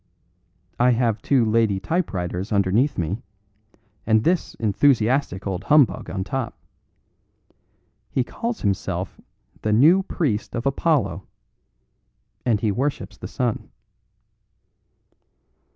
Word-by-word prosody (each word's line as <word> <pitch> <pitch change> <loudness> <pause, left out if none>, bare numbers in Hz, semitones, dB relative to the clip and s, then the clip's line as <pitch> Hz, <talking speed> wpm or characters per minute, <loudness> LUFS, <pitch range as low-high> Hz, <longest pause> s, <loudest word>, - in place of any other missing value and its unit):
I 125 +1 +5
have 115 -2 0
two 130 -5 +3
lady 110 -3 +2
typewriters 95 - -2
underneath 105 +8 +2
me, 90 +7 -2 0.9
and 110 -1 +4
this 175 0 0
enthusiastic 115 -1 +1
old 95 0 -3
humbug 145 -11 +3
on 95 +2 -3
top. 120 +3 -4 1.5
He 130 - 0
calls 230 - -4
himself 100 -2 -2 0.4
the 110 - 0
New 155 - +6
Priest 145 - -2
of 115 - -3
Apollo, 135 - 0 1.2
and 115 -4 +1
he 110 - +1
worships 135 +8 -2
the - - -6
sun." 125 -4 -2
115 Hz, 105 wpm, -23 LUFS, 100-140 Hz, 1.5 s, New